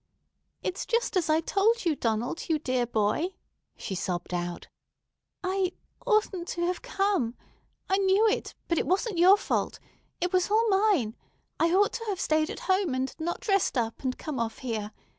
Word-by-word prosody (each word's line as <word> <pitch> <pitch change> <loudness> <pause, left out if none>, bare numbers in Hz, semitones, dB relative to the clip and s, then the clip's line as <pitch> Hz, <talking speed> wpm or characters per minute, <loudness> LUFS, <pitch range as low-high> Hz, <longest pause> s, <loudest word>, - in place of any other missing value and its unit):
"It's 370 - -3
just 470 -2 0
as 345 -4 +1
I 310 +1 +4
told 425 +6 +2
you, 325 -3 +2
Donald, 230 +7 -2
you 320 - +3
dear 255 -4 0
boy," 225 - 0 0.4
she - - -5
sobbed 180 -1 -3
out. 175 0 -3 0.8
"I—oughtn't 380 +1 -1
to 345 -1 -1
have 360 +1 -1
come. 395 - 0 0.5
I 385 +1 +2
knew 395 +3 +4
it, 435 - -1
but 335 - +1
it - - -1
wasn't 375 +2 0
your 375 +4 +8
fault. - - -1 0.4
It 360 +1 -1
was 365 0 +2
all 445 +2 +3
mine. 385 - +2 0.4
I 330 +1 +3
ought 400 +3 +3
to 460 - -4
have 395 -4 -2
stayed 310 0 +1
at - - -6
home, 375 -7 +1
and 260 +1 -2
not 340 +2 -3
dressed 390 - +1
up 225 -2 -1
and 255 -1 -2
come 300 -4 -4
off 225 -1 -2
here. 215 -3 -3
345 Hz, 175 wpm, -28 LUFS, 255-390 Hz, 0.8 s, your